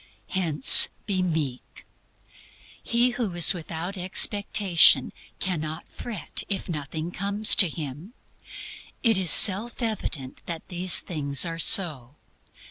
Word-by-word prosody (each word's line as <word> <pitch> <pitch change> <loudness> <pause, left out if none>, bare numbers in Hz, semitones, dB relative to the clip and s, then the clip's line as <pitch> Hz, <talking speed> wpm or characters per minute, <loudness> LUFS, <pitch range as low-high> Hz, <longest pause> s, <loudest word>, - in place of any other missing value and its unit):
Hence, 160 -8 +5 0.2
be 190 -3 -3
meek. 155 -8 -6 1.0
He 240 +2 0
who 235 -7 -5
is 175 -2 +6
without 175 +2 -7
expectation 185 -5 +2 0.2
cannot 160 -3 -5
fret 215 -10 -5
if 200 - -1
nothing 155 0 -7
comes 200 +3 +2
to 185 - +3
him. 155 - -9 0.9
It 225 -5 +3
is 185 -3 -3
self 210 +8 +4
evident 205 - -5
that 165 -2 -8
these 180 0 -1
things 145 -3 -1
are 165 -1 -7
so. 150 - +1
175 Hz, 115 wpm, -23 LUFS, 155-200 Hz, 1.0 s, is